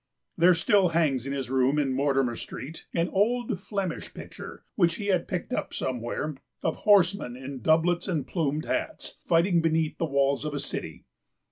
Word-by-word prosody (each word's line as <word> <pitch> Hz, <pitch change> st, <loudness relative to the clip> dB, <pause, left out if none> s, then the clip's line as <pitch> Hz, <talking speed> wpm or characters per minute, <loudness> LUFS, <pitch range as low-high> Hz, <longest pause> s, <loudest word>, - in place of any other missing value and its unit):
There 175 Hz, +1 st, +5 dB
still 190 Hz, +3 st, +4 dB
hangs 145 Hz, -6 st, +1 dB
in -, -, -3 dB
his 135 Hz, -2 st, -4 dB
room 135 Hz, +2 st, +3 dB
in 140 Hz, -3 st, +1 dB
Mortimer 135 Hz, -3 st, +1 dB
Street 140 Hz, +9 st, -8 dB
an 170 Hz, 0 st, +1 dB
old 225 Hz, +1 st, +1 dB
Flemish 195 Hz, -4 st, -4 dB
picture, -, -, -9 dB
which 170 Hz, -4 st, +2 dB
he 205 Hz, +2 st, -4 dB
had 180 Hz, -, 0 dB
picked 180 Hz, -3 st, -3 dB
up -, -, -3 dB
somewhere, 125 Hz, +4 st, -3 dB, 0.3 s
of 160 Hz, -, 0 dB
horsemen 195 Hz, -10 st, +3 dB
in 130 Hz, 0 st, -7 dB
doublets 165 Hz, -, +2 dB
and 160 Hz, -7 st, -1 dB
plumed 155 Hz, -3 st, -1 dB
hats, -, -, -3 dB
fighting 170 Hz, +1 st, +3 dB
beneath 160 Hz, -1 st, 0 dB
the 165 Hz, -, +1 dB
walls 140 Hz, 0 st, +1 dB
of 150 Hz, -1 st, -3 dB
a -, -, -1 dB
city. -, -, -5 dB
160 Hz, 170 wpm, -27 LUFS, 135-180 Hz, 0.3 s, There